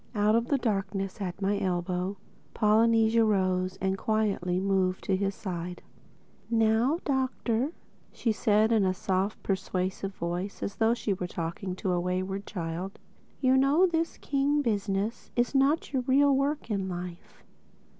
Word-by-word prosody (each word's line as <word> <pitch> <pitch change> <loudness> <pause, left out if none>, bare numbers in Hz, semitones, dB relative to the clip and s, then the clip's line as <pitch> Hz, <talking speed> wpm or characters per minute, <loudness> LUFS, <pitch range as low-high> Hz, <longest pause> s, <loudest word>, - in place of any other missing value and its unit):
Out 210 +1 +3
of 230 +1 +2
the 280 - +2
darkness 195 -3 -2
at 190 +1 -4
my 200 +1 +1
elbow 180 +1 -1 0.4
Polynesia 225 +1 +4
rose 185 -3 +1
and 190 0 -1
quietly 200 -5 0
moved 190 -1 0
down 195 - +3
to 200 - -2
his 195 0 -1
side. 180 -3 -5 0.7
"Now 225 +5 +3
Doctor," 260 -1 0 0.4
said 225 -3 -1 0.4
she - - +4
in 215 - +3
a 185 -1 +1
soft 190 +2 -1
persuasive 190 0 -2
voice 175 +4 -4
as 200 - -4
though 225 +1 +3
she 210 -4 -1
were 180 -1 -4
talking 175 +2 -4
to 185 0 -2
a 175 - +1
wayward 185 +2 -2
child, 175 +1 -4 0.4
"you 260 -1 +4
know 275 +7 +5
this 330 -2 -1
king 285 +1 +1
business 205 -1 -1
is 240 +2 +1
not 280 +3 +2
your 260 - +1
real 275 +2 +4
work 275 -2 -1
in 195 -2 -1
life. 175 -1 -8
200 Hz, 155 wpm, -28 LUFS, 185-235 Hz, 0.7 s, know